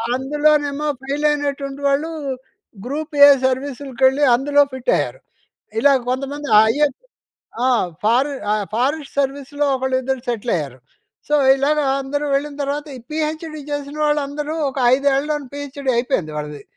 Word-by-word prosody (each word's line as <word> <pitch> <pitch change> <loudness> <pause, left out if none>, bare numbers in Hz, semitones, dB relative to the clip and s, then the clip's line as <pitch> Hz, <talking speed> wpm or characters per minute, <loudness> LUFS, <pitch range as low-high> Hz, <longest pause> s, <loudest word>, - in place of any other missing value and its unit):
అందులోనేమో 295 +2 +1
fail 280 +3 -2
అయినటువంటి 285 -1 -2
వాళ్ళు 280 +3 +1 0.8
group 300 +5 -4
A - - +9 0.2
సర్వీసులకెళ్ళి, 265 +1 0
అందులో 285 +3 +3
ఫిట్ 260 -1 -1
అయ్యారు. - - -3 0.6
ఇలా 280 +3 +5 0.2
కొంతమంది 280 +3 -3 0.2
ఐఏఎస్ 285 +3 +1 0.7
ఆ! - - +3 0.4
ఫారె 250 +6 +2 0.2
అ - - +3 0.2
ఫారెస్ట్ 275 +5 -1
సర్వీస్‌లో 280 +1 -2
ఒకళ్ళు 260 0 0
ఇద్దరు 265 0 -2
సెటిల్ 235 0 -1
అయ్యారు. 140 -5 -5 0.5
సో, 295 - +2 0.2
ఇలాగా 295 +2 +1 0.2
అందరూ 285 +2 -3
వెళ్ళిన 285 +1 -1
తర్వాత 285 +2 -3
ఈ - - -9
పీహెచ్‌డి 310 0 -3
చేసిన 290 0 -4
వాళ్ళందరూ 295 +1 -1
ఒక 270 - -6 0.2
5ఏళ్లు 280 +2 +1 0.2
పీహెచ్‌డి 280 -1 -4
అయిపోయింది 235 - -1
వాళ్ళది. 150 -1 -6
280 Hz, 130 wpm, -20 LUFS, 265-295 Hz, 0.8 s, A